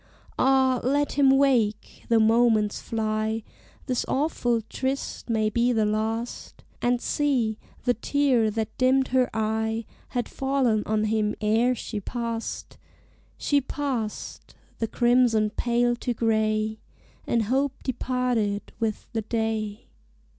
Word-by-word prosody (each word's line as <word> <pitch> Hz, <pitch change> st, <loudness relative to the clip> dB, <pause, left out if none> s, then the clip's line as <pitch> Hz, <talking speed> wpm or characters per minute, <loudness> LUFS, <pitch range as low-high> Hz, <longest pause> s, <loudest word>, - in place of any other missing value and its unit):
Ah, 260 Hz, -1 st, +3 dB
let 285 Hz, +3 st, +1 dB
him 275 Hz, -1 st, +4 dB
wake! 255 Hz, -6 st, +2 dB
The 230 Hz, -1 st, +5 dB
moments 220 Hz, -1 st, +3 dB
fly: 220 Hz, 0 st, -1 dB, 0.4 s
This 255 Hz, -3 st, 0 dB
awful 245 Hz, -5 st, 0 dB
tryst 260 Hz, +4 st, -4 dB
may 220 Hz, -2 st, +2 dB
be 240 Hz, +3 st, +2 dB
the 220 Hz, -3 st, +2 dB
last. 220 Hz, +3 st, -3 dB, 0.2 s
And 245 Hz, 0 st, +2 dB
see, 245 Hz, -7 st, 0 dB, 0.2 s
the 245 Hz, -, +3 dB
tear, 250 Hz, -2 st, +2 dB
that 220 Hz, 0 st, -3 dB
dimmed 260 Hz, +1 st, +3 dB
her 255 Hz, -1 st, +2 dB
eye, 220 Hz, +1 st, -1 dB, 0.2 s
Had 245 Hz, -1 st, -2 dB
fallen 265 Hz, -5 st, +1 dB
on 215 Hz, 0 st, +1 dB
him 215 Hz, -1 st, 0 dB
ere 225 Hz, +4 st, +2 dB
she 220 Hz, -2 st, -5 dB
passed 230 Hz, +2 st, -5 dB, 0.6 s
She 285 Hz, -1 st, +2 dB
passed: 260 Hz, -6 st, -4 dB, 0.2 s
the 225 Hz, -, 0 dB
crimson 240 Hz, -3 st, +3 dB
paled 240 Hz, +1 st, 0 dB
to 245 Hz, -, -1 dB
gray: 220 Hz, -1 st, 0 dB, 0.5 s
And 230 Hz, -1 st, +2 dB
hope 265 Hz, +4 st, -1 dB
departed 245 Hz, -5 st, -1 dB
with 220 Hz, -2 st, -2 dB
the 225 Hz, -, 0 dB
day. 220 Hz, -1 st, -2 dB
230 Hz, 125 wpm, -26 LUFS, 220-255 Hz, 0.6 s, The